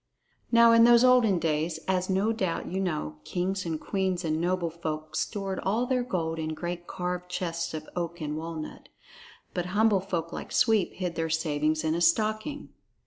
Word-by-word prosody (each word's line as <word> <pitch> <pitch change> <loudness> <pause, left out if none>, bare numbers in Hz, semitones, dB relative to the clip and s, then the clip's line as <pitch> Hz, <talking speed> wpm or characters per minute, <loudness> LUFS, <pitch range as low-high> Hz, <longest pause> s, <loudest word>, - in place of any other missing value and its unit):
Now 235 0 +7
in 230 0 +7
those 235 0 +7
olden 250 -6 +5
days, 160 0 0
as 185 0 0
no 195 +4 +2
doubt 190 -6 -2
you 185 - -3
know, 155 - -2
kings 185 - -2
and 160 -2 -2
queens 190 -1 -1
and 155 0 0
noble 175 -1 0
folk 155 -2 -5
stored 195 -3 -2
all 220 +6 0
their 255 0 +1
gold 165 -9 -2
in 155 0 -3
great 175 +1 -5
carved 180 0 -4
chests 170 -2 -3
of 155 0 -6
oak 170 -1 -3
and 150 -1 -3
walnut; 160 0 -6 0.6
but 180 0 -2
humble 215 -2 +4
folk 170 -3 -3
like - - -6
Sweep 220 -5 +3
hid 180 -2 -3
their 165 -1 -2
savings 155 -1 0
in 160 0 +1
a 170 - -1
stocking. 215 - +1
180 Hz, 180 wpm, -28 LUFS, 160-195 Hz, 0.6 s, Now